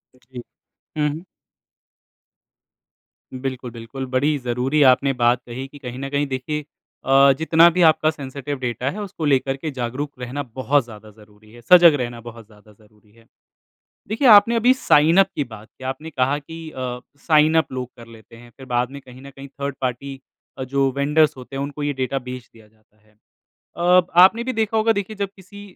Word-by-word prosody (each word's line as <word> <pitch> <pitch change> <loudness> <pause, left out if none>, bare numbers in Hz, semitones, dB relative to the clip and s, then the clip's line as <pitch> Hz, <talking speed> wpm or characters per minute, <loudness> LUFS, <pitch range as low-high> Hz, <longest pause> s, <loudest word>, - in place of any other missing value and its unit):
जी, 125 -1 -12 0.6
हुँ। 150 +3 -2 2.1
बिल्कुल-बिल्कुल, 130 -1 -6
बड़ी 135 +4 0
ज़रूरी 125 +4 -1
आपने 135 +2 +2
बात 120 -1 +1
कही 130 +3 -7
कि 145 - -15
कहीं 125 -2 -8
ना 135 0 -5
कहीं 145 +1 -1
देखिए 140 +3 -4 0.4
अ, 135 +1 +5
जितना 160 +2 +5
भी 180 +2 -1
आपका 155 0 +3
सेंसिटिव 140 -1 -6
डाटा 125 +1 -3
है 210 - -7
उसको 185 -5 -6
लेकर 135 -1 +1
के 155 +3 -5
जागरूक 130 +3 -4
रहना 125 +3 -5
बहुत 135 +2 +1
ज़्यादा 110 -2 -13
ज़रूरी 105 0 -21
है, 120 +1 -15
सजग 170 +5 +7
रहना 120 -1 -5
बहुत 115 -1 -11
ज़्यादा 105 0 -20
ज़रूरी 105 0 -26
है, 115 +1 -23 0.8
देखिए 225 +6 0
आपने 215 +1 +7
अभी 240 +3 +4
साइन 165 - +3
अप 195 - +5
की 150 - -1
बात 110 -4 -13
की - - -13
आपने 135 +5 -5
कहा 135 -1 0
की 160 +2 -10 0.6
साइन 155 0 +4
अप 160 - +1
लोग 130 -1 -5
कर 115 -1 -13
लेते 115 0 -16
हैं 120 +1 -15
फिर 135 - -12
बाद 125 0 -1
में 140 0 -9
कहीं 130 -1 -15
ना 140 - -11
कहीं 140 0 -12
थर्ड 140 0 -6
पार्टी 135 +2 -4 0.5
जो 140 -1 +2
वेंडर्स 150 +2 +2
होते 130 +1 -11
हैं 135 - -2
उनको 145 +1 -6
ये 145 0 -1
डाटा 130 0 -2
बेच 125 -1 -8
दिया 110 -2 -19
जाता 110 0 -34
है, 110 0 -31 0.6
अ, 180 +1 +4 0.2
आपने 225 +5 +4
भी 255 +1 -3
देखा 220 0 -1
होगा 220 +1 +3
देखिए 215 +2 -11
जब 200 -1 -2
किसी 195 +2 -14
135 Hz, 185 wpm, -21 LUFS, 120-155 Hz, 2.1 s, सजग